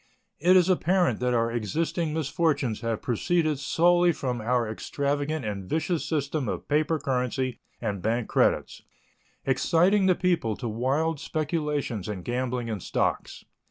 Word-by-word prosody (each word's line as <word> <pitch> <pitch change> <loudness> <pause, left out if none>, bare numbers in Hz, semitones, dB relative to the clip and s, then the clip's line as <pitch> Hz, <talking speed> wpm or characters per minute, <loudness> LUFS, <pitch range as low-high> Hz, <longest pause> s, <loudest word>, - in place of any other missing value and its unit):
It 180 +4 +5
is 180 -1 +4
apparent 180 - +2
that 125 0 +1
our 115 0 +1
existing 155 - -1
misfortunes 150 - 0
have 115 -2 -2
proceeded 155 - 0
solely 175 +5 +3
from 125 -6 -3
our 120 +1 +1
extravagant 145 +5 -2
and 100 -3 -5
vicious 160 +1 0
system 145 -2 -1
of - - -4
paper 155 +2 +2
currency 130 -2 -1 0.2
and 105 -5 -3
bank 115 +3 0
credits, - - +1 0.6
exciting 175 +9 +3
the 185 - +4
people 170 - 0
to 120 - -5
wild 135 +8 0
speculations 150 - -2
and 95 -4 -5
gambling 125 0 -2
in 110 -3 -3
stocks. - - -2
140 Hz, 140 wpm, -26 LUFS, 120-160 Hz, 0.6 s, It